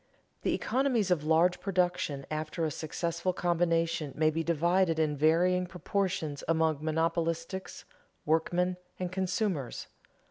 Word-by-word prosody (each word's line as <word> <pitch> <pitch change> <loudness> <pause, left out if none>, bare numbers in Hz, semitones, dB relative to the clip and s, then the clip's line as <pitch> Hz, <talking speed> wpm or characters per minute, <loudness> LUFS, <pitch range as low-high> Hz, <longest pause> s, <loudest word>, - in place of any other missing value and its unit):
_The - - +1
economies 250 -7 +1
of 165 -5 +2
large 165 +3 +3
production 180 -7 0
after 155 +2 -2
a 155 - -1
successful 170 +4 -2
combination 165 -4 0
may 155 0 +3
be 165 +1 -1
divided 170 +1 +2
in 155 -2 +1
varying 175 +5 +3
proportions 180 -5 -2
among 160 -2 +1
monopolists, 165 +3 -2 0.4
workmen, 175 +3 +1 0.2
and 180 -1 -3
consumers. 185 - -2
170 Hz, 115 wpm, -30 LUFS, 155-180 Hz, 0.4 s, large